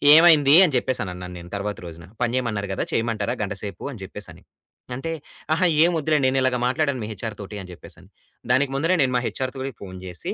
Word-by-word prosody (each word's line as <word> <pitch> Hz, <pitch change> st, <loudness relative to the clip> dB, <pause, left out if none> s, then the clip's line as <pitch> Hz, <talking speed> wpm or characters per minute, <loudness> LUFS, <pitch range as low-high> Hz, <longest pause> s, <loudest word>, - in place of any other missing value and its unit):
ఏమైంది 155 Hz, -4 st, +7 dB
అని 155 Hz, -, -1 dB
జెప్పేసనన్నాను 90 Hz, -8 st, -2 dB
నేను 85 Hz, +1 st, -12 dB
తరువాత 100 Hz, +1 st, -3 dB
రోజున. 85 Hz, +1 st, -11 dB, 0.2 s
పని 120 Hz, 0 st, 0 dB
జేయమన్నారు 110 Hz, -6 st, -1 dB
గదా! -, -, -1 dB
చేయమంటారా 115 Hz, 0 st, 0 dB
గంట 100 Hz, -, -3 dB
సేపు 100 Hz, -4 st, -6 dB
అని 115 Hz, -, -10 dB
జెప్పేసని. 95 Hz, -3 st, -9 dB, 0.5 s
అంటే 150 Hz, +6 st, -4 dB, 0.4 s
"అహా! 180 Hz, +3 st, +2 dB, 0.2 s
ఏమొద్దులేండి 155 Hz, -4 st, +2 dB
నేనిలాగా 130 Hz, -1 st, +2 dB
మాట్లాడాను 130 Hz, 0 st, 0 dB
మీ -, -, -4 dB
హెచ్‌ఆర్ 110 Hz, +2 st, -5 dB
తోటి" 100 Hz, +1 st, -7 dB
అని 90 Hz, -, -10 dB
చెప్పేసని, -, -, -12 dB, 0.4 s
దానికి 135 Hz, +2 st, +3 dB
ముందరే 165 Hz, +6 st, +2 dB
నేను 130 Hz, -2 st, +2 dB
మా 125 Hz, -, +2 dB
హెచ్‌ఆర్‌తో 130 Hz, 0 st, -4 dB, 0.2 s
ఫోను 95 Hz, -2 st, -8 dB
జేసి 90 Hz, -3 st, -4 dB
120 Hz, 180 wpm, -23 LUFS, 100-135 Hz, 0.5 s, ఏమైంది